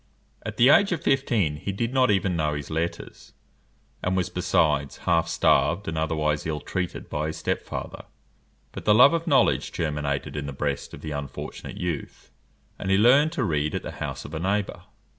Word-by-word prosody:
At - - -6
the 120 +3 +6
age 200 +7 +5
of 170 -4 -2
fifteen 115 - +1
he 100 - -4
did 115 +5 -2
not 130 -2 +3
even 95 -3 +1
know 75 -2 0
his 75 +1 -6
letters, 80 +2 -4 0.7
and 95 +1 0
was, 90 -1 -1
besides, 80 -6 +1
half 85 -1 +2
starved, 85 +3 +2
and 80 - -3
otherwise 75 -1 -1
ill 75 -2 -2
treated 90 +3 -4
by 75 +1 -2
his 80 - -5
step - - -1
father; - - -7 0.7
but - - -8
the 105 - +5
love 130 +7 +7
of 165 0 -1
knowledge 125 - +3
germinated 75 -4 -2
in 70 -1 -4
the 70 - -5
breast 70 0 -3
of - - -13
the 80 - -6
unfortunate 70 -2 -6
youth, 85 -5 -5 0.5
and 95 - -4
he 95 - +4
learned 135 +8 +5
to 140 - -1
read 75 -6 0
at - - -3
the - - -5
house - - -4
of 70 - -9
a 80 - -3
neighbour. 100 +3 -2
85 Hz, 195 wpm, -25 LUFS, 75-105 Hz, 0.7 s, love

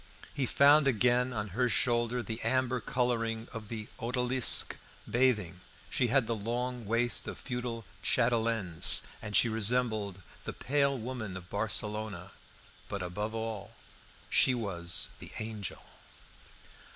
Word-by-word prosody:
He 135 -3 -1
found 145 +3 +5
again 125 +1 +2
on 105 -3 -3
her 125 +6 0
shoulder 120 +2 +1
the 110 0 -5
amber 130 -1 +1
colouring 115 -1 -1
of 110 -2 -7
the 110 0 -6
"Odalisque 125 +1 +3 0.3
Bathing"; 105 -8 +1 0.3
she 125 - +1
had 130 +1 +2
the 115 - -1
long 120 +2 -3
waist 115 +2 +2
of - - -5
feudal 120 -3 -5 0.2
chatelaines, 115 -7 +2 0.2
and 105 - -5
she - - +6
resembled 110 -3 +1 0.2
the - - -5
"Pale 140 0 +1
Woman 110 -5 -5
of 90 -1 -12
Barcelona." 105 -2 -1 0.6
But 100 -2 -4
above 105 +5 -4
all 110 -3 -5 0.5
she 130 - +4
was 90 -6 +1
the - - -10
Angel! 110 -4 -5
115 Hz, 125 wpm, -31 LUFS, 105-125 Hz, 0.6 s, she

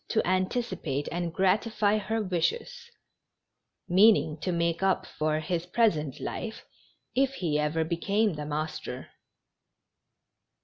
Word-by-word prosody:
to 220 - +1
anticipate 185 - -1
and 175 -1 -2
gratify 205 +3 +2
her 220 +2 -1
wishes, 185 - -2 1.0
meaning 190 -4 +5
to 185 - -1
make 170 -1 0
np 190 -1 +1
for 155 0 -1
his 170 +2 -2
present 160 - +1
life 220 -1 -5 0.5
if 270 +1 +2
he 160 - 0
ever 150 +2 +1
became 195 +5 +1
the 150 -1 -5
master. 155 +1 -4
180 Hz, 115 wpm, -28 LUFS, 160-210 Hz, 1.0 s, meaning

